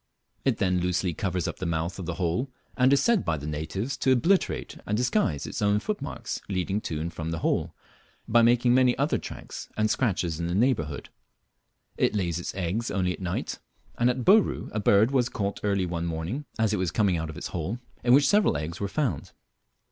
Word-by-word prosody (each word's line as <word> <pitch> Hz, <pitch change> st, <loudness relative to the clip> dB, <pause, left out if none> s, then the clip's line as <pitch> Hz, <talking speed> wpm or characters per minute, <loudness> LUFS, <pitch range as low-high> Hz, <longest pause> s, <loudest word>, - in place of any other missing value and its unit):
It -, -, +2 dB
then 90 Hz, -2 st, +1 dB
loosely 90 Hz, 0 st, 0 dB
covers 90 Hz, -3 st, -2 dB
up -, -, -4 dB
the 90 Hz, -, -3 dB
mouth 85 Hz, +3 st, -2 dB
of 90 Hz, -, -5 dB
the 85 Hz, -, -2 dB
hole, 90 Hz, +9 st, -1 dB, 0.3 s
and 130 Hz, +1 st, +4 dB
is 140 Hz, -, +4 dB
said 235 Hz, -5 st, +3 dB
by 80 Hz, -, 0 dB
the 70 Hz, -, -7 dB
natives 80 Hz, -, -3 dB
to 130 Hz, -, +2 dB
obliterate 170 Hz, +10 st, +1 dB
and 105 Hz, -, 0 dB
disguise 125 Hz, -, +1 dB
its -, -, -5 dB
own 105 Hz, 0 st, +3 dB
footmarks 175 Hz, -, -4 dB
leading 95 Hz, +2 st, -1 dB
to 80 Hz, -6 st, -4 dB
and 85 Hz, +1 st, -4 dB
from 80 Hz, -1 st, -4 dB
the 80 Hz, -, -2 dB
hole, -, -, 0 dB, 0.5 s
by 120 Hz, +1 st, +5 dB
making 120 Hz, +1 st, +4 dB
many 125 Hz, -1 st, +4 dB
other 140 Hz, +3 st, +1 dB
tracks -, -, -8 dB
and 110 Hz, 0 st, +2 dB
scratches 90 Hz, -10 st, 0 dB
in 85 Hz, -, -1 dB
the 85 Hz, -, -1 dB
neighbourhood. 100 Hz, -, 0 dB, 0.9 s
It -, -, +2 dB
lays 85 Hz, -4 st, 0 dB
its 90 Hz, -, -5 dB
eggs 95 Hz, +5 st, -2 dB
only 90 Hz, -2 st, 0 dB
at -, -, -10 dB
night, 90 Hz, -1 st, -3 dB, 0.4 s
and 120 Hz, +1 st, +3 dB
at 125 Hz, 0 st, -1 dB
Bouru 205 Hz, +2 st, +4 dB
a 110 Hz, -, -1 dB
bird 105 Hz, +4 st, +4 dB
was 125 Hz, -3 st, +2 dB
caught 100 Hz, -3 st, -3 dB
early 100 Hz, -2 st, +1 dB
one 85 Hz, -1 st, -3 dB
morning 85 Hz, -, -3 dB
as 110 Hz, -1 st, +2 dB
it -, -, +1 dB
was 90 Hz, -2 st, 0 dB
coming 100 Hz, 0 st, +2 dB
out 80 Hz, 0 st, -3 dB
of 75 Hz, -, -8 dB
its -, -, -5 dB
hole, 90 Hz, +7 st, -3 dB, 0.3 s
in 120 Hz, -, +3 dB
which 140 Hz, +3 st, +6 dB
several 205 Hz, -, +3 dB
eggs 80 Hz, +4 st, -5 dB
were 100 Hz, -, -1 dB
found. 140 Hz, +5 st, -2 dB
100 Hz, 210 wpm, -27 LUFS, 85-125 Hz, 0.9 s, which